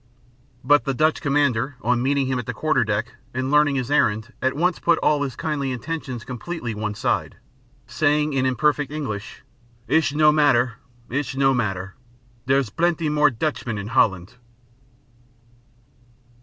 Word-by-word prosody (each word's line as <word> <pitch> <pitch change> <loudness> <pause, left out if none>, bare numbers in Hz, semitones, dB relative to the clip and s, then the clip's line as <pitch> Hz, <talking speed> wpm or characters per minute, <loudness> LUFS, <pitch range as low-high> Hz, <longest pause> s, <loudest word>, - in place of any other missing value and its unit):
But 145 +3 +4
the 135 -2 -1
Dutch 155 +4 +2
commander, 140 -3 +1
on 120 +1 +1
meeting 140 +1 +1
him 130 -1 -1
at 125 - -7
the 125 - -4
quarter 155 +6 +1
deck, 105 +1 -2 0.2
and 130 +1 -2
learning 150 -1 +4
his 130 0 -2
errand, 110 -4 +1
at 130 +1 0
once 175 +4 +1
put 170 - +3
all 150 -1 +2
his 135 -4 -3
kindly 145 -4 -2
intentions 130 -2 -5
completely 125 0 -5
one 105 0 -4
side, - - -1 0.5
saying 150 0 +1
in 135 -1 +1
imperfect 145 +2 +1
English: 120 -10 -6 0.4
"It'sh 160 -2 +2
no 150 0 +5
matter, 130 -6 +2 0.3
it'sh 135 +1 -3
no 135 0 +3
matter 100 -5 -2 0.5
dere's 135 -4 +2
blaanty 170 +2 0
more 150 -1 +4
Tutchmen 125 -3 -3
in 100 +1 -5
Holland!" 100 -3 +1
135 Hz, 150 wpm, -22 LUFS, 120-150 Hz, 0.5 s, no